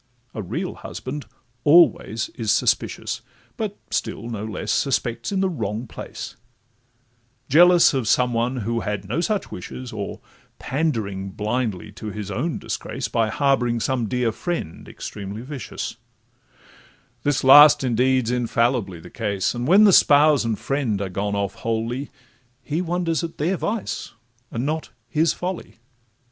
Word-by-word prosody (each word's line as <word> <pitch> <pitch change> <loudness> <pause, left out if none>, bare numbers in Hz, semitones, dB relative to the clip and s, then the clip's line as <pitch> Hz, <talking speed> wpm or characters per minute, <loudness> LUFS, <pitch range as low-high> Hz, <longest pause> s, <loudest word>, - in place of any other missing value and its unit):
A 110 - -4
real 95 - -3
husband 140 +3 -7 0.4
always 145 -8 +4
is 110 -3 -1
suspicious, - - 0 0.3
But - - -4
still 115 +2 -3
no 105 -2 -4
less 110 -4 -3
suspects 120 - 0
in 195 -1 0
the 190 - +2
wrong 110 - -3
place, - - -8 1.1
Jealous 175 +4 +7
of 130 -5 -1
some 125 +2 +3
one 120 +3 0
who 115 +1 0
had 105 -3 -3
no 120 +11 -1
such 210 +2 -1
wishes, 125 +7 -7
Or 100 -2 -5 0.4
pandering 110 -10 -2
blindly 105 -1 -2
to 110 +1 -8
his 105 -1 -5
own 150 - -2
disgrace, - - -4
By 115 -1 +1
harbouring 125 -3 +1
some 120 -1 0
dear 125 0 0
friend 170 - -4
extremely 100 +2 -7
vicious; 135 -1 -6 1.2
The 145 -2 +1
last 145 +2 +9
indeed 130 0 +2
's - - 0
infallibly 120 -5 0
the - - -13
case: 100 -5 -1
And 120 +1 -3
when 195 +6 +7
the 200 -3 +7
spouse 145 -2 +6
and 115 -2 -1
friend 135 -7 -1
are 100 -1 -3
gone 100 +2 -2
off 100 -1 -1
wholly, 115 +4 -3 0.5
He 155 +6 -1
wonders 175 -2 -1
at 165 - -5
their 175 +6 +1
vice, 215 +3 -3 0.4
and 120 +3 -3
not 155 +2 -2 0.2
his 160 +7 +2
folly. 180 0 -5
120 Hz, 145 wpm, -23 LUFS, 110-150 Hz, 1.2 s, last